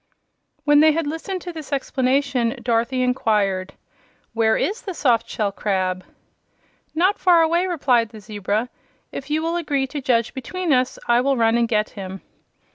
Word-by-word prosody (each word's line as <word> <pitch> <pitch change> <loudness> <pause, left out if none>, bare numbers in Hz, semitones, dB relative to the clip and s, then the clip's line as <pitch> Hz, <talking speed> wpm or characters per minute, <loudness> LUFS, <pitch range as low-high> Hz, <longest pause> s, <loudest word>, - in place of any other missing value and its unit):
When 295 0 +5
they 310 0 +6
had 330 0 -1
listened 325 +5 -4
to 350 - -6
this 310 -3 -9
explanation 265 -2 0
Dorothy 235 +2 +1
inquired: 205 -6 0 0.6
"Where 225 -1 +2
is 425 +5 -1
the 380 -6 -6
soft 245 -8 +1
shell 210 -2 -1
crab?" 185 -2 -1 0.9
"Not 370 +5 +2
far 345 -3 +5
away," 340 +3 +2
replied 255 -10 +2
the 220 -1 -11
zebra. 210 +2 -2 0.4
"If 275 - -7
you 310 +1 0
will 335 +1 -1
agree 285 -5 0
to 285 +2 -6
judge 235 -3 +1
between 330 +5 -2
us 255 0 +1
I 240 0 +4
will 270 +1 +1
run 225 0 +3
and 235 0 +2
get 215 -2 0
him." 190 -1 -7
255 Hz, 165 wpm, -22 LUFS, 225-315 Hz, 0.9 s, they